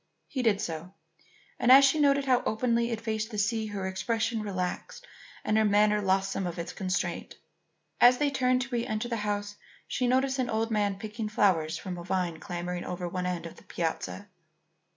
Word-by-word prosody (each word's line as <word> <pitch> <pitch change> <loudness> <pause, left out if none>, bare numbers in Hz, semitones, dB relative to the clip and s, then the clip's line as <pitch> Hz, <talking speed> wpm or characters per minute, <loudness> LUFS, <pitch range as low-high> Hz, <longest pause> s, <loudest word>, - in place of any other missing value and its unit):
He 260 - -3
did 220 -5 +2
so, 170 0 -5 0.6
and 245 - +4
as 275 +1 +10
she 275 +3 +3
noted 280 -1 +3
how 255 -2 +3
openly 235 +1 +1
it 230 -2 -2
faced 220 -1 -2
the 215 - -6
sea, 220 +1 0
her 200 -2 -4
expression 225 +4 -1
relaxed 200 - -4 0.4
and 215 +1 +2
her - - +4
manner 210 0 +3
lost 195 0 +1
some 190 - -2
of 175 - -5
its 170 - -5
constraint. 185 0 -3 0.6
As 245 +1 +7
they 290 0 +1
turned 255 -1 +2
to 265 - -9
re 240 -2 -1
enter 225 -1 -2
the 235 -1 -2
house, 205 -1 -3 0.3
she 250 - -1
noticed 265 +2 +2
an 250 -2 0
old 225 +1 -1
man 205 -2 +1
picking 215 +1 -5
flowers 170 -6 +2
from 180 -1 -6
a - - -7
vine 175 -2 -1
clambering 175 0 -4
over 180 0 -4
one 180 +1 -3
end 175 -2 -3
of 165 - -9
the - - -16
piazza. 175 +4 -4
210 Hz, 195 wpm, -28 LUFS, 185-240 Hz, 0.6 s, as